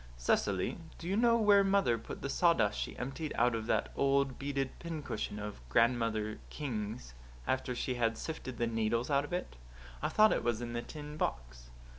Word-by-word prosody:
"Cecily, 95 - +1 0.2
do 170 - -7
you 190 - +1
know 235 +1 +5
where 205 -3 +6
mother 195 -11 +3
put 115 - -8
the - - -1
sawdust 165 - +3
she - - -4
emptied 135 +5 -4
out 120 +1 +3
of 110 -1 -3
that - - +1
old 140 -1 +2
beaded 140 -1 -1
pincushion 155 -11 -4
of 105 -9 -6
Grandmother 115 - +2
King's, 110 - -4 0.3
after 130 -1 -1
she 125 - -1
had 115 -2 0
sifted 145 -6 -5
the 120 - +1
needles 115 +3 0
out 140 +1 +3
of - - -11
it? 175 - -3 0.4
I - - 0
thought 215 0 +5
it - - -1
was 120 -2 +1
in 120 -1 -5
the 120 - -1
tin 150 +3 -8
box." - - -3
125 Hz, 185 wpm, -33 LUFS, 110-150 Hz, 0.4 s, where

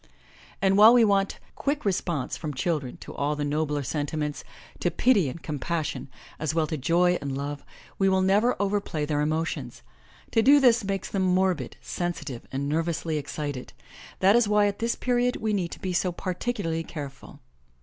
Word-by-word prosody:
And 195 +1 +4
while 220 +3 +9
we 235 -2 +6
want 200 -1 +1 0.2
quick 290 -1 -2
response 170 -8 -1
from 150 -3 -5
children 140 -3 -2
to - - -9
all 145 +1 -1
the 145 0 -2
nobler 150 0 -1
sen 145 +2 -2
timents, 150 -1 -3 0.4
to - - +1
pity 205 - +3
and 165 +6 -9
compassion, 155 -1 -3 0.3
as 155 0 -2
well 165 - +3
as - - -10
to 155 - -2
joy 175 +6 +2
and 140 -1 -3
love, 145 +1 -4 0.4
we 195 -1 +4
will 190 0 +2
never 205 +6 +3
overplay 200 -6 -1
their 150 -1 0
emotions. 155 +2 -2 0.5
To 225 - +4
do 280 +5 +7
this 240 -4 +4
makes 195 -1 -3
them 195 - 0
morbid, 185 -7 +1
sensitive 155 -8 -4
and 140 +1 -2
nervously 160 +1 -1
excited. 145 -2 -5 0.5
That 195 +3 +6
is 240 -3 +4
why 210 0 +4
at 200 0 -1
this 230 +1 0
period 245 0 +1
we 220 -1 -1
need 185 -4 0
to - - -9
be 185 -3 -3
so 180 +1 +1
particularly 180 -2 -3
careful. 140 -4 -9
170 Hz, 180 wpm, -26 LUFS, 150-200 Hz, 0.5 s, while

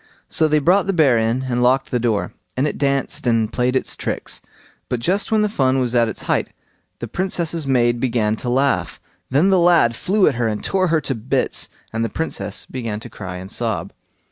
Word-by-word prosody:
So 160 - +2
they 155 0 +3
brought 180 +6 +3
the 195 - +1
bear 135 -7 +5
in, 115 +3 0
and 125 -2 -1
locked 130 +2 +2
the 125 - +1
door, 115 -3 -1 0.2
and 135 +3 +2
it - - -4
danced 140 -2 0
and 115 -2 +1
played 125 +1 +1
its 130 - 0
tricks; - - -4 0.5
but 125 - -1
just 190 - 0
when 220 -1 +3
the 210 - +3
fun 135 -10 +1
was 125 -2 0
at 120 -2 +3
its - - -6
height, - - 0 0.5
the 120 - -6
Princess's 170 - -1
maid 120 -2 +2
began 115 -4 +1
to 125 - -4
laugh. 125 -8 +1 0.3
Then 145 +9 +3
the 190 - +4
lad 170 -9 +4
flew 195 - +2
at 150 - +3
her 115 - +2
and 105 -1 -3
tore 185 -1 +1
her 160 -2 +2
to 135 - -1
bits, 130 +3 0 0.2
and 115 0 -1
the 115 - -1
Princess 105 -9 -3
began 115 -5 -4
to 120 +1 -11
cry 95 -4 -7
and 95 +1 -8
sob. - - -2
130 Hz, 215 wpm, -20 LUFS, 115-155 Hz, 0.5 s, bear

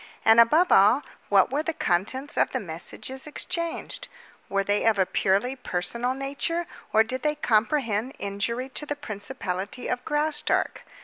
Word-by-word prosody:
And, 225 +1 +7
above 310 +10 +5
all, 210 +9 +6 0.3
what 200 +2 +4
were 285 +3 +1
the 330 +1 -2
contents 260 - -1
of - - +3
the - - -2
messages 265 +2 -6
exchanged? 335 +2 -3 0.4
Were 195 0 +1
they 205 +1 +1
of 225 -2 +4
a 190 - +3
purely 200 +9 +1
personal 240 +3 -1
nature, 285 +6 -2 0.3
or 220 - +5
did 255 +3 -4
they 300 0 0
comprehend 235 -2 +1
injury 205 +6 -2
to 300 +3 -4
the 290 - -2
principality 205 -3 -4
of 245 - -2
Graustark? 300 +1 0
250 Hz, 150 wpm, -26 LUFS, 205-290 Hz, 0.4 s, And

